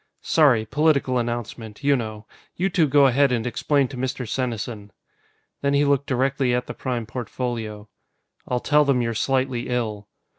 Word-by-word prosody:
"Sorry. 130 Hz, -9 st, +4 dB
Political 140 Hz, 0 st, +2 dB
announcement, 120 Hz, 0 st, -5 dB
you 140 Hz, 0 st, +4 dB
know. 110 Hz, -3 st, -5 dB, 0.3 s
You 190 Hz, +2 st, 0 dB
two 170 Hz, -5 st, +3 dB
go 140 Hz, 0 st, +5 dB
ahead 135 Hz, +1 st, +4 dB
and 120 Hz, -2 st, 0 dB
explain 140 Hz, +3 st, +1 dB
to 135 Hz, -, -8 dB
Mr. 125 Hz, -1 st, -3 dB
Senesin." 115 Hz, -4 st, -3 dB, 0.7 s
Then 140 Hz, 0 st, +1 dB
he 145 Hz, +1 st, +3 dB
looked 140 Hz, -1 st, +1 dB
directly 130 Hz, -1 st, +1 dB
at 125 Hz, 0 st, -1 dB
the -, -, -6 dB
Prime 125 Hz, -3 st, -3 dB
Portfolio. 115 Hz, -3 st, -5 dB, 0.6 s
"I'll 125 Hz, -, 0 dB
tell 150 Hz, 0 st, +4 dB
them 135 Hz, -4 st, +2 dB
you're 115 Hz, 0 st, -1 dB
slightly 130 Hz, +1 st, -1 dB
ill." 110 Hz, -4 st, -2 dB
125 Hz, 160 wpm, -23 LUFS, 115-140 Hz, 0.7 s, go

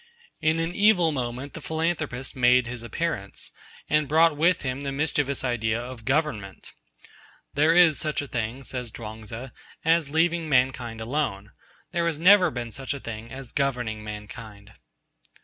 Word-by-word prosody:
In 160 Hz, +1 st, +2 dB
an 165 Hz, +1 st, -1 dB
evil 190 Hz, -5 st, +4 dB
moment 130 Hz, 0 st, -4 dB
the 165 Hz, -, -8 dB
Philanthropist 160 Hz, -5 st, -2 dB
made 125 Hz, -1 st, +5 dB
his 120 Hz, 0 st, -6 dB
appearance, 120 Hz, -5 st, -4 dB, 0.4 s
and 150 Hz, -1 st, +2 dB
brought 160 Hz, +1 st, +4 dB
with 170 Hz, +4 st, +2 dB
him 130 Hz, +1 st, -2 dB
the 140 Hz, -1 st, -3 dB
mischievous 140 Hz, -1 st, 0 dB
idea 115 Hz, -3 st, 0 dB
of 120 Hz, -2 st, -8 dB
Government. 130 Hz, -9 st, -2 dB, 0.8 s
'There 155 Hz, +3 st, +4 dB
is 175 Hz, -4 st, +6 dB
such 155 Hz, -2 st, -1 dB
a 145 Hz, -, -2 dB
thing,' 120 Hz, +2 st, -3 dB
says 125 Hz, -2 st, -5 dB
Chuang 110 Hz, 0 st, -8 dB
Tzu, 115 Hz, +5 st, -7 dB, 0.4 s
'as 165 Hz, -2 st, +3 dB
leaving 165 Hz, +1 st, +1 dB
mankind 125 Hz, -4 st, +1 dB
alone: 110 Hz, -5 st, -2 dB, 0.4 s
there 170 Hz, -1 st, 0 dB
has 165 Hz, -3 st, 0 dB
never 180 Hz, +2 st, +6 dB
been 120 Hz, -5 st, -5 dB
such 135 Hz, +3 st, -4 dB
a -, -, -6 dB
thing 115 Hz, -1 st, -7 dB
as 130 Hz, -2 st, -8 dB
governing 125 Hz, -6 st, -1 dB
mankind.' 105 Hz, 0 st, -9 dB
135 Hz, 155 wpm, -26 LUFS, 115-160 Hz, 0.8 s, is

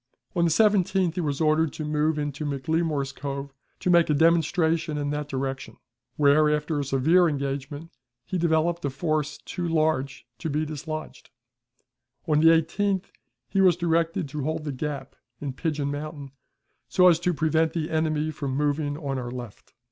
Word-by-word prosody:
On 170 Hz, -1 st, +3 dB
the -, -, +3 dB
17th 190 Hz, -2 st, +3 dB
he 180 Hz, -, -2 dB
was 145 Hz, -3 st, -2 dB
ordered 155 Hz, -1 st, +2 dB
to 155 Hz, -, -5 dB
move 150 Hz, +1 st, +1 dB
into 145 Hz, 0 st, -3 dB
McLemore's 150 Hz, 0 st, -1 dB
Cove 140 Hz, 0 st, -6 dB, 0.3 s
to 180 Hz, -, +1 dB
make 170 Hz, -2 st, +5 dB
a 150 Hz, -, +3 dB
demonstration 165 Hz, 0 st, +2 dB
in 145 Hz, -1 st, -2 dB
that 150 Hz, 0 st, -3 dB
direction, 135 Hz, 0 st, -4 dB, 0.4 s
where, 150 Hz, +1 st, +4 dB
after 150 Hz, 0 st, 0 dB
a -, -, 0 dB
severe 155 Hz, +6 st, +3 dB
engagement, 140 Hz, +2 st, -4 dB, 0.3 s
he 185 Hz, -, -2 dB
developed 170 Hz, +1 st, +1 dB
a 140 Hz, -, 0 dB
force 155 Hz, +1 st, -2 dB
too 175 Hz, -1 st, -5 dB
large 155 Hz, -6 st, 0 dB
to 160 Hz, -, -3 dB
be 155 Hz, +2 st, 0 dB
dislodged. 155 Hz, +1 st, -6 dB, 1.0 s
On 150 Hz, -2 st, +3 dB
the 160 Hz, -, +5 dB
18th 190 Hz, +4 st, +2 dB, 0.4 s
he 195 Hz, -, +1 dB
was 180 Hz, -3 st, +5 dB
directed 170 Hz, 0 st, 0 dB
to 150 Hz, 0 st, -4 dB
hold 155 Hz, +2 st, -2 dB
the 150 Hz, -, -3 dB
gap 140 Hz, +1 st, -5 dB, 0.2 s
in 140 Hz, -2 st, -4 dB
Pigeon 145 Hz, -1 st, -2 dB
Mountain, 145 Hz, -1 st, -6 dB, 0.6 s
so 180 Hz, -1 st, +5 dB
as 170 Hz, -2 st, +5 dB
to 180 Hz, +1 st, +1 dB
prevent 160 Hz, 0 st, +1 dB
the 160 Hz, -2 st, -2 dB
enemy 155 Hz, -1 st, 0 dB
from 140 Hz, -3 st, -3 dB
moving 145 Hz, 0 st, 0 dB
on 140 Hz, -4 st, -3 dB
our 120 Hz, -1 st, -5 dB
left. 120 Hz, -4 st, -9 dB
155 Hz, 170 wpm, -26 LUFS, 145-165 Hz, 1.0 s, make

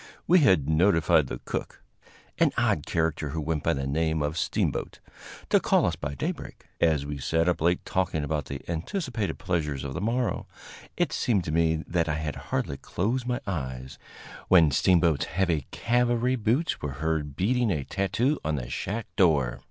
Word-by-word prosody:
We 180 Hz, +2 st, +6 dB
had 95 Hz, -, +4 dB
notified 80 Hz, -2 st, +3 dB
the -, -, -6 dB
cook, -, -, -5 dB, 0.6 s
an -, -, +4 dB
odd 75 Hz, -, +1 dB
character 80 Hz, -2 st, 0 dB
who 80 Hz, +3 st, -3 dB
went 80 Hz, 0 st, -1 dB
by -, -, +1 dB
the 70 Hz, -1 st, -3 dB
name 80 Hz, +2 st, 0 dB
of 75 Hz, +1 st, -2 dB
Steamboat, -, -, -1 dB, 0.5 s
to -, -, +6 dB
call -, -, +3 dB
us -, -, 0 dB
by 70 Hz, 0 st, -5 dB
daybreak. -, -, -5 dB
As 75 Hz, -4 st, +2 dB
we 70 Hz, -1 st, -5 dB
sat 80 Hz, +5 st, +1 dB
up 90 Hz, -, +1 dB
late 85 Hz, +2 st, +1 dB
talking 90 Hz, -5 st, -1 dB
about 75 Hz, -1 st, -2 dB
the 70 Hz, -1 st, -7 dB
anticipated 110 Hz, -, -3 dB
pleasures 75 Hz, -6 st, -2 dB
of 70 Hz, -1 st, -5 dB
the 90 Hz, -, -4 dB
morrow, 115 Hz, +3 st, -1 dB, 0.5 s
it -, -, +1 dB
seemed 105 Hz, -7 st, +1 dB
to 80 Hz, -, -4 dB
me 80 Hz, 0 st, +1 dB
that 85 Hz, -2 st, 0 dB
I 75 Hz, -, 0 dB
had 80 Hz, -1 st, -3 dB
hardly 70 Hz, -, -1 dB
closed 120 Hz, -, -2 dB
my 125 Hz, -1 st, -1 dB
eyes 65 Hz, -8 st, -5 dB, 0.5 s
when 85 Hz, -5 st, +6 dB
Steamboat's 85 Hz, 0 st, +3 dB
heavy 85 Hz, -3 st, 0 dB
cavalry 120 Hz, +1 st, +1 dB
boots 125 Hz, +8 st, 0 dB
were 70 Hz, -2 st, -3 dB
heard 75 Hz, -1 st, -2 dB
beating 120 Hz, -, +1 dB
a 75 Hz, -6 st, -1 dB
tattoo 115 Hz, -, 0 dB
on 80 Hz, -, 0 dB
the -, -, -5 dB
shack 110 Hz, +2 st, -3 dB
door. 75 Hz, -9 st, +3 dB
80 Hz, 175 wpm, -27 LUFS, 75-100 Hz, 0.6 s, We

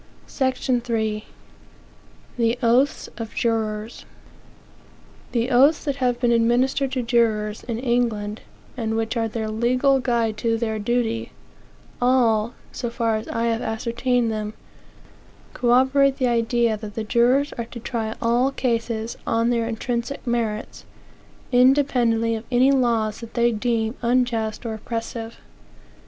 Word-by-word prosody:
SECTION 260 Hz, -2 st, 0 dB
III. 220 Hz, -2 st, -1 dB, 1.1 s
The 235 Hz, 0 st, +1 dB
Oaths 245 Hz, +5 st, +2 dB
of 225 Hz, -2 st, -7 dB
Jurors. 220 Hz, -1 st, -2 dB, 1.3 s
The 240 Hz, +2 st, 0 dB
oaths 275 Hz, +6 st, +5 dB
that 280 Hz, -3 st, -2 dB
have 250 Hz, -2 st, 0 dB
been 240 Hz, -1 st, +2 dB
administered 245 Hz, +4 st, +2 dB
to 255 Hz, -2 st, -1 dB
jurors, 220 Hz, -3 st, +1 dB
in 235 Hz, -2 st, -3 dB
England, 230 Hz, -4 st, -1 dB, 0.3 s
and 225 Hz, -2 st, -2 dB
which 225 Hz, +2 st, -1 dB
are 225 Hz, -1 st, 0 dB
their 220 Hz, 0 st, -3 dB
legal 250 Hz, +5 st, +2 dB
guide 235 Hz, -4 st, 0 dB
to 225 Hz, +1 st, 0 dB
their 220 Hz, -1 st, -2 dB
duty, 230 Hz, +1 st, -1 dB, 0.7 s
all 235 Hz, -3 st, +2 dB, 0.2 s
(so 240 Hz, -, -4 dB
far 230 Hz, -1 st, 0 dB
as 215 Hz, -, -7 dB
I 230 Hz, -, -2 dB
have 230 Hz, 0 st, 0 dB
ascertained 235 Hz, +1 st, 0 dB
them) 215 Hz, 0 st, -4 dB, 1.0 s
corroborate 265 Hz, +3 st, +3 dB
the 260 Hz, -, +1 dB
idea 235 Hz, -1 st, +1 dB
that 210 Hz, -1 st, -9 dB
the 225 Hz, -, -2 dB
jurors 245 Hz, +6 st, +2 dB
are 235 Hz, -, -4 dB
to 235 Hz, +1 st, -9 dB
try 225 Hz, -2 st, -3 dB
all 240 Hz, +3 st, +2 dB
cases 230 Hz, -3 st, -2 dB
on 230 Hz, +1 st, +2 dB
their 230 Hz, -1 st, 0 dB
intrinsic 235 Hz, +4 st, -3 dB
merits, 230 Hz, -3 st, -2 dB, 0.7 s
independently 245 Hz, -3 st, +3 dB
of 220 Hz, 0 st, -4 dB
any 255 Hz, +2 st, +4 dB
laws 230 Hz, -5 st, +1 dB
that 230 Hz, -1 st, -10 dB
they 240 Hz, 0 st, +3 dB
deem 225 Hz, 0 st, -1 dB
unjust 235 Hz, -2 st, 0 dB
or 225 Hz, -, -2 dB
oppressive. 225 Hz, +1 st, -5 dB
235 Hz, 135 wpm, -23 LUFS, 225-245 Hz, 1.3 s, oaths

